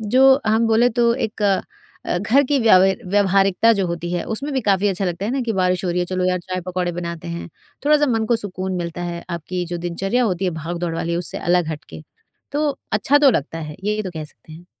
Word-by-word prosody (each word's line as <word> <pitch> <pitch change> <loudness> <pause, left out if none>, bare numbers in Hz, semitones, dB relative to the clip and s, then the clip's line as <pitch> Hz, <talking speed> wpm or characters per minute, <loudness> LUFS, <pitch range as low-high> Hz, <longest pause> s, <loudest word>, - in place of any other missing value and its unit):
जो 265 +5 +5
हम 220 +1 +3
बोले 225 +2 +4
तो 235 0 +4
एक 220 -4 -3 0.6
अ, - - -2
घर 235 +9 +3
की 285 - +2
व्याव 190 -5 +6 0.3
व्यवहारिकता 195 +2 +3
जो 200 -4 0
होती 170 0 -4
है, 175 - -1
उसमें 275 +6 -4
भी 265 - 0
काफ़ी 200 +1 +3
अच्छा 195 0 -1
लगता 175 +2 -3
है 220 - -1
ना 270 - 0
कि 225 - 0
बारिश 185 -1 0
हो 175 - 0
रही 175 - -1
है 175 - +1
चलो 185 0 -1
यार, 180 0 +1
चाय-पकौड़े 180 0 -3
बनाते 170 -1 -5
हैं, 170 +1 -5 0.4
थोड़ा-सा 295 0 +4
मन 225 -1 +1
को 235 - +2
सुकून 190 -3 -3
मिलता 175 0 -4
है। 170 -1 -5
आपकी 175 +2 -3
जो 175 0 -4
दिनचर्या 195 +8 -1
होती 190 -2 -1
है 180 - +1
भागदौड़ 170 0 -3
वाली 170 +1 -2
उससे 175 - -3
अलग 175 -2 +1
हटके, 155 0 -8 0.5
तो 295 0 +1 0.2
अच्छा 270 +7 +3
तो 285 -2 +6
लगता 165 - -2
है, 150 -2 -7
ये 210 +1 0
तो 185 - -5
कह 155 -1 -4
सकते 155 +1 -16
हैं। 170 +3 -12
185 Hz, 225 wpm, -21 LUFS, 175-220 Hz, 0.6 s, व्याव